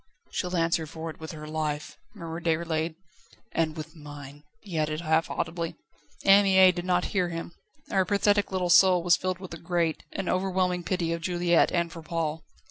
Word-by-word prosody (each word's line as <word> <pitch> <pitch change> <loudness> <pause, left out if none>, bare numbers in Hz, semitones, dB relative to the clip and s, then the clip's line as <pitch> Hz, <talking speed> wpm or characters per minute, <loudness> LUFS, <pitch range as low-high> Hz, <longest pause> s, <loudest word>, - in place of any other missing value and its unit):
"She'll 180 -1 -2
answer 165 -1 +1
for 160 +1 -6
it - - -16
with 160 0 -7
her 150 -1 -8
life," 155 -1 -3 0.2
murmured 165 -2 -7
Déroulède. 160 -1 0 0.6
"And 160 -1 0
with 155 +2 -7
mine!" 145 -2 -10 0.2
he 180 -6 -4
added 155 +1 -1
half 160 -1 +1
audibly. 165 0 -3 0.5
Anne 195 +1 +7
Mie 190 -1 +6
did 175 0 -5
not 180 -1 +2
hear 180 -3 +1
him; 165 0 -5 0.4
her 190 -1 +3
pathetic 205 +1 +2
little 180 -2 0
soul 180 -1 +6
was 175 -1 +5
filled 185 0 -2
with 185 -2 -9
a 170 - -7
great, 170 -2 0
an 195 - -3
overwhelming 185 -1 0
pity 170 -2 -1
of 170 - -4
Juliette 175 -1 +2
and 170 -1 0
for 165 - -8
Paul. 160 -1 -3
170 Hz, 185 wpm, -27 LUFS, 160-185 Hz, 0.6 s, Anne